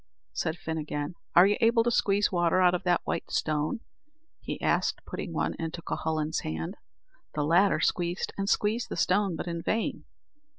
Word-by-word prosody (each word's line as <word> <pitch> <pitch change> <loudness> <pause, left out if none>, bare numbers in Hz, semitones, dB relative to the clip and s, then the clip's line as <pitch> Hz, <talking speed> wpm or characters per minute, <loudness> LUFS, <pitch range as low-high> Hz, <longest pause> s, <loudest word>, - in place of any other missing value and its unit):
said 160 - -2
Fin 160 -2 -4
again; 150 +1 -3 0.2
"are 175 - +9
you 205 +1 +2
able 230 0 +4
to 240 - +1
squeeze 205 -2 +2
water 175 0 +2
out 180 -1 +5
of 180 - 0
that 175 -1 +2
white - - -3
stone?" 155 +9 -1 0.6
he - - -5
asked - - 0
putting - - -5
one - - -1
into 165 +1 -4
Cuhullin's 155 0 -1
hand. 80 +1 -4 0.6
The 150 - 0
latter 175 +6 +4
squeezed 175 +1 0
and 195 0 -2
squeezed 220 +4 +1
the - - -4
stone, 195 -1 +2
but - - -4
in 170 -1 -3
vain. 225 +6 -1
175 Hz, 175 wpm, -28 LUFS, 160-200 Hz, 0.6 s, are